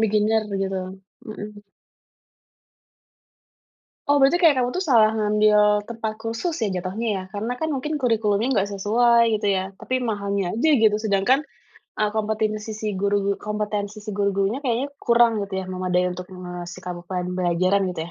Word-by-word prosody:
Beginner 215 0 +2
begitu. 195 -1 -2 0.4
Mhm. 210 -1 -8 2.5
Oh, 285 -1 +4
berarti 280 +6 +5
kayak 330 -5 +5
kamu 245 - 0
tuh 370 +5 -2
salah 225 -6 +5
ngambil 210 0 +3
tempat 225 -2 -4
kursus 230 +10 -3
ya 215 - +2
jatuhnya 195 +6 -4
ya 185 - -5
karena 220 +4 -2
kan 315 - -1
mungkin 300 +3 -2
kurikulumnya 225 -2 +1
nggak 200 0 +1
sesuai 235 +2 +3
gitu 210 - -1
ya. 190 -1 +1
Tapi 255 +6 -2
mahalnya 200 -5 -2
aja 250 +8 +1
gitu. 215 -1 +5
Sedangkan, 215 +8 +2 0.5
eee, 210 -1 +1
kompetensi 215 0 -2
si 215 0 -4
guru 200 0 +1
gu 200 - +1 0.2
kompetensi 210 0 -3
si 210 - -5
guru-gurunya 200 +3 0
kayaknya 260 0 -1
kurang 235 -2 +3
gitu 200 -1 -5
ya - - -9
memadai 180 -1 0
untuk, 180 0 -7
eee, 180 - -10
ngasih 180 0 -7
kamu 175 -1 -6
pembelajaran 180 +1 0
gitu 160 - -3
210 Hz, 155 wpm, -23 LUFS, 195-230 Hz, 2.5 s, berarti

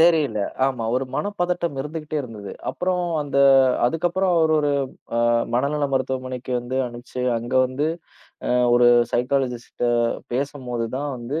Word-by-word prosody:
தெரியல, 160 -9 +4 0.3
ஆமா, 125 -4 -2
ஒரு 130 +1 +1
மனப்பதட்டம் 175 -5 -1
இருந்துகிட்டே 155 +1 -5
இருந்தது. 110 -6 -8 0.2
அப்புறம், 180 0 -1 0.2
அந்த 140 -1 -1 0.5
அதுக்கப்புறம் 175 +6 0
அவர் 160 -1 +3
ஒரு 145 -1 +1 0.5
அ - - +2 0.4
மனநல 145 +4 +1
மருத்துவமனைக்கு 130 -1 -2
வந்து 125 +2 -4
அனுப்பிச்சு, 120 +1 -7 0.2
அங்க 120 +3 -5
வந்து 135 +4 -2 0.6
அ - - 0 0.2
ஒரு 120 0 +5 0.3
சைகலிஸ்ட் 125 -1 -1 0.5
பேசும்போது 125 -3 -2
தான் 145 +1 -3
வந்து 125 +7 -4
135 Hz, 125 wpm, -23 LUFS, 125-155 Hz, 0.6 s, ஒரு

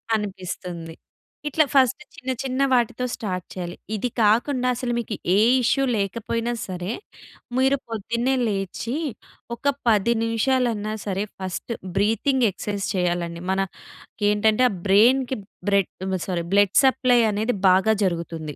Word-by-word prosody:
అనిపిస్తుంది. 180 -5 -5 0.5
ఇట్లా 310 +1 +3
ఫస్ట్ 260 0 +4
చిన్న 260 -1 -4
చిన్న 265 +1 -2
వాటితో 245 0 +1
స్టార్ట్ 185 -4 -4
చేయాలి. 175 -2 -5 0.2
ఇది 245 +4 -1
కాకుండా 245 +5 +2
అసలు 240 0 -2
మీకు 220 -2 -4 0.2
ఏ - - +4 0.3
ఇష్యూ 275 +3 +2
లేకపోయినా 230 +4 -2
సరే, 180 +2 -4 0.7
మీరు 265 +1 +3
పొద్దున్నే 235 +4 -1
లేచి 200 +5 -3 0.6
ఒక 280 +3 0
10 225 +1 +4
నిమిషాలన్నా 230 -2 0
సరే! 195 0 -1 0.2
ఫస్ట్ 190 +5 -5 0.3
బ్రీతింగ్ 225 +5 +2
ఎక్సర్‌సైజ్ 200 +1 -4
చేయాలండి. 175 -1 -1
మన 190 - 0 0.7
ఏంటంటే 215 +4 +3
ఆ! - - -4 0.2
బ్రైన్‌కి 245 +6 +4 0.3
బ్రెడ్ 200 -2 +2 0.4
సారీ 175 -2 -1
బ్లడ్ 205 -1 +4
సప్లై 255 -2 +4
అనేది 215 +3 0
బాగా 190 +4 +4
జరుగుతుంది. 165 -4 -3
215 Hz, 125 wpm, -23 LUFS, 190-250 Hz, 0.7 s, ఫస్ట్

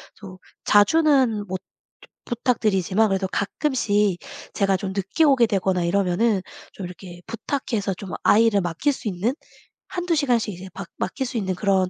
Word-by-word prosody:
좀 190 -3 -11 0.3
자주는 250 -1 +4
못 185 0 -3
즈 - - -53 0.7
부탁드리지만 215 -4 +1
그래도 190 0 0
가끔씩 205 - 0 0.3
제가 195 -2 +2
좀 190 0 -4
늦게 195 - 0
오게 270 -6 +5
되거나 190 -3 0
이러면은 195 +3 +1 0.3
좀 195 - -7
이렇게 175 0 -10
부탁해서 225 -4 -2
좀 185 0 -8
아이를 220 -2 +4
맡길 175 - 0
수 250 - -7
있는 205 +5 0 0.5
1-2 355 -1 -2
시간씩 245 -8 +1
이제 185 +2 -9
맡 195 - -6
맡길 265 +8 -2
수 245 - -4
있는 190 -4 -1
그런 190 -1 +1
205 Hz, 315 characters per minute, -23 LUFS, 190-235 Hz, 0.7 s, 오게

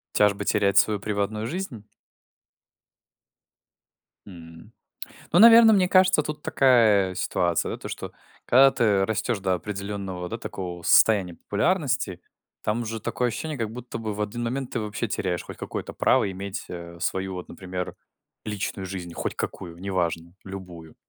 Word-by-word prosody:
Тяжбы 105 -1 +3
терять 100 -2 +2
свою 105 -1 +3
приватную 105 +1 -2
жизнь? 130 - -5 2.4
М. 85 +1 -13 0.6
Ну, 175 - +5
наверно, 230 +1 +9
мне 190 -3 +4
кажется, 185 -3 +5
тут 150 0 -6
такая 110 -8 +4
ситуация, 85 -2 0
да: - - -4
то, - - -8
что - - -6 0.3
когда 135 +2 +7
ты 105 -6 +2
растешь 110 +2 -1
до 95 -1 +1
определенного, 95 -1 -5
да, 115 - -5
такого 90 -6 -6
состояния 95 -2 +4
популярности, 125 - -1 0.4
там 110 +3 -1
уже 115 -1 -5
такое 125 +4 -1
ощущение, 145 +6 -4
как 110 -2 -2
будто 120 0 -7
бы 110 -2 -4
в 105 - -6
один 110 +3 -3
момент 130 +2 -3
ты 120 - -2
вообще 110 +2 -3
теряешь 90 -4 -2
хоть - - -10
какое-то - - -6
право 100 - +2
иметь, 95 +1 -6
э, 85 -1 -8
свою, 95 +1 -2
вот 90 - -7
например, 90 -1 -6 0.5
личную 100 -2 -4
жизнь, 90 -2 -6
хоть - - -3
какую, 85 -2 -5
неважно, 85 -2 -2
любую. 90 -4 -9
100 Hz, 150 wpm, -25 LUFS, 95-120 Hz, 2.4 s, наверно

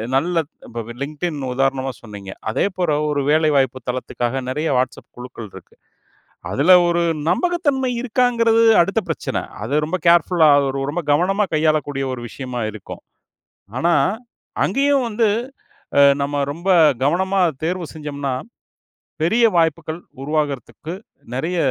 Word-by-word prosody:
நல்ல 165 +4 +1 0.2
இப்ப 115 0 -6 0.2
LinkedIn 155 +3 -3 0.2
உதாரணமா 135 0 0
சொன்னீங்க. 100 -4 -9 0.2
அதே - - +1
போற 175 -3 0 0.2
ஒரு 145 -1 0
வேலை 155 0 +3
வாய்ப்புத் 130 -2 -1
தளத்துக்காக 125 0 -3
றைய 155 0 0
WhatsApp 130 0 -3
குழுக்கள் 125 -3 -9
இருக்கு. - - -14 0.8
அதுல 145 - +3 0.2
ஒரு 170 0 +1 0.3
நம்பகத்தன்மை 300 -8 +1
இருக்காங்கறது 235 -2 +2 0.2
அடுத்த 195 +6 +1
பிரச்சன, - - -3 0.3
அது 115 +6 -4
ரொம்ப 170 +4 -2
கேர்ஃபுல்லா, 170 -1 +5
அது 140 - +2
ஒரு 135 - -4
ரொம்ப 175 - -2
கவனமா 190 +7 +2
கையாளக்கூடிய 155 -3 +1
ஒரு 125 - -6
விஷயமா 125 -1 -5
இருக்கும். 105 -2 -10 0.8
ஆனா, 170 +5 +2 0.7
அங்கேயும் 275 -2 +2
வந்து 225 0 +1 0.7
அ - - +8 0.2
நம்ம 145 +1 -1
ரொம்ப 170 +6 -8 0.4
கவனமாத் 180 -1 +1
தேர்வு 175 +2 -2
செஞ்சோம்னா, 145 -3 -4 0.9
பெரிய 225 +8 +3
வாய்ப்புகள் 160 0 0 0.2
உருவாகுறதுக்கு 150 +2 -3 0.4
நெறைய 165 +7 -2
155 Hz, 125 wpm, -20 LUFS, 135-180 Hz, 0.9 s, அ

